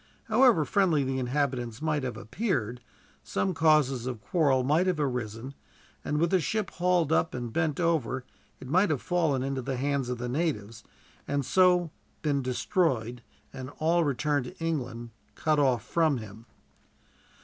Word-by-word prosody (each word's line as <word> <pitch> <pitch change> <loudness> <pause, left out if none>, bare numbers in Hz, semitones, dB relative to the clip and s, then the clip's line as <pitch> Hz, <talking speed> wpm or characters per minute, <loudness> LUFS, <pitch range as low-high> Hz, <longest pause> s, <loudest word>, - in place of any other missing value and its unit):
However 230 - +4
friendly 175 -7 +2
the 130 0 -2
inhabitants 125 -3 -1
might 155 -1 0
have 130 -2 -4
appeared, 125 - -2 0.4
some 190 - -1
causes 150 -6 +3
of 125 -3 -4
quarrel 140 -1 +2
might 155 +8 +2
have 180 -4 0
arisen; 125 -2 -3 0.5
and 150 - -1
with 165 +2 +1
the 190 - +4
ship 210 +3 -2
hauled 175 -3 +1
up 160 -2 +1
and 120 -2 -5
bent 160 -3 0
over, 145 -7 0 0.3
it 130 - -10
might 185 +8 +3
have 150 -4 0
fallen 160 -7 +1
into 135 -1 -2
the 130 +1 -3
hands 140 -1 -1
of 125 - -2
the 125 +1 -4
natives, 120 -7 -2 0.4
and 140 -2 -1
so 180 -1 +3 0.3
been 145 -3 +1
destroyed, 125 - 0 0.3
and 130 -1 -7
all 165 +2 +2
return 145 0 0
to 125 - -9
England 130 -8 -3 0.2
cut 155 -1 +1
off 130 -6 +2
from 160 -5 +2
him. 110 +1 -10
140 Hz, 160 wpm, -28 LUFS, 125-165 Hz, 0.5 s, However